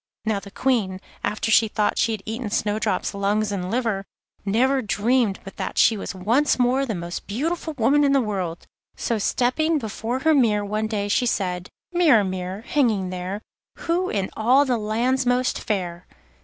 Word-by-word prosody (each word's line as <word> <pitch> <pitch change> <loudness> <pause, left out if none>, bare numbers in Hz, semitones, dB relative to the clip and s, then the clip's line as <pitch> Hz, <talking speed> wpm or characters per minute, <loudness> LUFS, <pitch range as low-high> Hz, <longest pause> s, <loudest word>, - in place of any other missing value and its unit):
Now 215 -2 +1
the 200 - -11
Queen, 205 -5 0 0.2
after 215 +1 -1
she 220 +1 +5
thought 210 0 0
she 230 - +2
had 210 -3 -6
eaten 225 +1 -4
Snowdrop's 210 +1 -1
lungs 205 +2 0
and 185 -2 -3
liver, 225 -4 -1 0.4
never 255 +7 +2
dreamed 220 0 +1
but 195 - -11
that - - -4
she 225 - +5
was 200 - -5
once 235 +11 +2
more 255 +2 +2
the 220 - -2
most 170 0 -6
beautiful 315 +8 -2
woman 275 +5 +4
in 280 - +3
the 275 - +4
world; 190 -8 -3 0.3
so 230 -2 -1
stepping 305 +10 +1
before 225 0 -3
her 320 +2 +4
mirror 215 -7 +3
one 215 +2 -1
day 205 -2 -2
she 245 +4 +2
said: 180 -5 -1 0.2
'Mirror, 310 -12 +5
mirror, 185 +1 -4
hanging 225 -8 +1
there, 185 +4 -5 0.4
Who 350 +2 +1
in 195 -2 -2
all 255 +6 +4
the 250 -4 0
land's 245 +5 0
most 250 +1 +1
fair? 180 -4 -3
220 Hz, 175 wpm, -23 LUFS, 200-255 Hz, 0.4 s, she